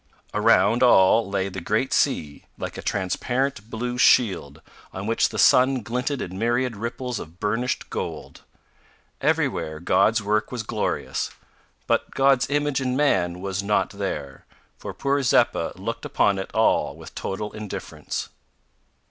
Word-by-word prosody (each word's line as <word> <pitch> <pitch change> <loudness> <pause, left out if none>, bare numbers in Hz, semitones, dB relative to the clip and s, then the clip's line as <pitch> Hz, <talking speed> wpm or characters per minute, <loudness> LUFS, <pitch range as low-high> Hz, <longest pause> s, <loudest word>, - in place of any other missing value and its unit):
Around 110 +4 +4
all 110 -3 +5
lay 100 -1 -1
the 95 -1 -6
great 105 +9 0
sea, 75 - 0
like - - -5
a - - -6
transparent 120 +4 -2
blue 120 +2 -4
shield, 90 - +3 0.3
on 95 +1 -6
which 115 +1 +2
the - - -7
sun 130 -1 +4
glinted 125 +4 -2
in 95 +1 -7
myriad 120 +1 0
ripples 120 +2 -4
of 80 +3 -11
burnished 115 +5 -2
gold. - - -5 0.8
Everywhere 80 0 0
God's 95 +6 +3
work 105 +1 0
was 125 -3 -3
glorious, 110 -1 -2 0.6
but - - 0
God's 135 -2 +3
image 145 -1 0
in 130 0 -1
man 90 -12 +1
was 95 0 -2
not 100 -1 0
there, 75 -10 -5 0.4
for - - -6
poor 140 +1 0
Zeppa 130 - +2
looked - - -5
upon 100 -1 +1
it 95 - -5
all - - +2
with - - -12
total 105 +2 -4
indifference. 105 -2 -6
110 Hz, 140 wpm, -24 LUFS, 95-125 Hz, 0.8 s, all